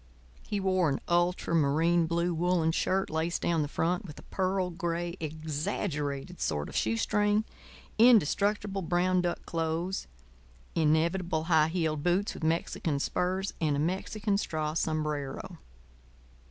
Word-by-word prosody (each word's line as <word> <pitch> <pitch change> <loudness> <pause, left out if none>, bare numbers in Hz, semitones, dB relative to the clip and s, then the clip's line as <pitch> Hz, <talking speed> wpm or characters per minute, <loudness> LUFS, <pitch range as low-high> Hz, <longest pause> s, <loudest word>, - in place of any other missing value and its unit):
He 205 - -3
wore 185 -3 +2
an 135 - -1
ultramarine 170 -1 +2
blue 170 +1 0
woollen 170 -1 +2
shirt 190 +3 0
laced 160 +2 -1
down 170 -2 +2
the 145 - -1
front 175 +7 0
with 155 -7 -10
a - - -11
pearl 185 -1 -1
gray, 170 0 -3
exaggerated 155 0 -3
sort 75 -2 -1
of - - -10
shoestring, 205 - +2 0.6
indestructible 205 -2 +4
brown 180 +1 +2
duck 175 -1 -2
clothes, 165 +3 -2 0.7
inevitable 165 +2 +1
high 160 -2 +4
heeled 160 -3 -1
boots 180 +5 +1
with - - -9
Mexican 160 -2 0
spurs, 185 +6 -1
and 150 -3 +2
a - - -1
Mexican 200 +5 -1
straw 155 -5 -2
sombrero. 155 +1 -2
170 Hz, 125 wpm, -29 LUFS, 155-185 Hz, 0.7 s, indestructible